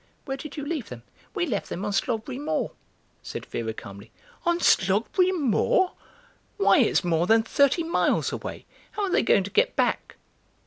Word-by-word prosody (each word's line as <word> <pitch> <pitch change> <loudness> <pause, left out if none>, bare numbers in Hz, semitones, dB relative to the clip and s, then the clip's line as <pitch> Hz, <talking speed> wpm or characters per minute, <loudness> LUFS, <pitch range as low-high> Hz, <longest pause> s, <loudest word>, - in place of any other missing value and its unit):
Where 270 - -3
did 295 +2 -9
you 290 - -4
leave 300 -6 -4
them?" 120 -2 -9 0.3
"We 365 -4 +1
left 225 - -3
them 190 - -4
on 205 - -1
Slogberry 235 +5 -2
Moor," 220 - -2 0.5
said - - -7
Vera 115 -1 -4
calmly. 100 -1 -10 0.4
"On 345 0 +3
Slogberry 220 - +3
Moor? 355 - +2 0.7
Why, 405 - +4
it's - - +3
more 170 0 +1
than 225 0 +5
thirty 280 +7 +2
miles 335 +1 +1
away! - - -6 0.3
How 420 - -2
are 390 - -1
they - - +3
going 200 -3 +3
to 200 - -7
get - - +2
back?" - - 0
245 Hz, 175 wpm, -25 LUFS, -, 0.7 s, than